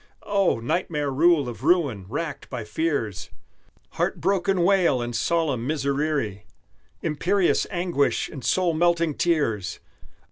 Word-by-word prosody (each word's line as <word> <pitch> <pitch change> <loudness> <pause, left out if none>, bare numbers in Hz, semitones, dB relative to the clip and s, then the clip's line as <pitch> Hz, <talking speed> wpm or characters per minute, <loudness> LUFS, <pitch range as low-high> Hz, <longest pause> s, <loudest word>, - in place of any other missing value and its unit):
Oh! 195 - +2
nightmare 150 +3 -1
rule 155 0 +3
of 120 +1 -7
ruin, 145 - +2
racked 155 +5 -4
by 125 -4 -5
fears, 110 - -2 0.6
Heartbroken 195 -1 0
wail, 180 -8 +3
and 120 0 -4
solemn 145 -8 0
miserere, 140 -7 -1 0.6
Imperious 175 +5 +1
anguish, 175 -5 0
and 135 -5 -9
soul 180 -3 +2
melting 170 -1 +2
tears! 115 - 0
155 Hz, 110 wpm, -24 LUFS, 125-175 Hz, 0.6 s, rule